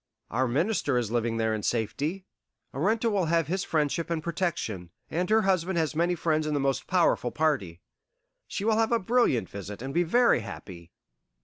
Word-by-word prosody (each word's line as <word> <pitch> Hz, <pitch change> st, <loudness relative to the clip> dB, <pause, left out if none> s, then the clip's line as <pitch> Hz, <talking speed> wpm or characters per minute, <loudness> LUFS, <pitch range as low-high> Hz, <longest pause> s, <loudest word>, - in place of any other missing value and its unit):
Our 130 Hz, +3 st, +1 dB
Minister 155 Hz, -, +1 dB
is 115 Hz, -3 st, -1 dB
living 115 Hz, -1 st, 0 dB
there 110 Hz, -1 st, +1 dB
in 110 Hz, -, -2 dB
safety. 145 Hz, -, -2 dB, 0.5 s
Arenta 220 Hz, -, +1 dB
will 195 Hz, -4 st, +1 dB
have 165 Hz, 0 st, +2 dB
his 185 Hz, +3 st, -2 dB
friendship 155 Hz, +1 st, -1 dB
and 165 Hz, -2 st, -2 dB
protection; 165 Hz, -, -2 dB, 0.2 s
and 180 Hz, +3 st, -1 dB
her 220 Hz, 0 st, +4 dB
husband 185 Hz, -2 st, +1 dB
has 160 Hz, -2 st, 0 dB
many 175 Hz, +2 st, +2 dB
friends 155 Hz, -2 st, 0 dB
in 150 Hz, -, 0 dB
the -, -, +1 dB
most 135 Hz, -1 st, -1 dB
powerful 175 Hz, -8 st, +2 dB
party. 120 Hz, -, -1 dB, 0.7 s
She 200 Hz, -, -4 dB
will 220 Hz, -1 st, +3 dB
have 225 Hz, 0 st, +2 dB
a 235 Hz, -, +4 dB
brilliant 210 Hz, -, +2 dB
visit 100 Hz, +1 st, -8 dB
and 135 Hz, +1 st, -5 dB
be 175 Hz, -, +3 dB
very 235 Hz, -, +4 dB
happy." 95 Hz, -5 st, -9 dB
155 Hz, 185 wpm, -27 LUFS, 120-185 Hz, 0.7 s, her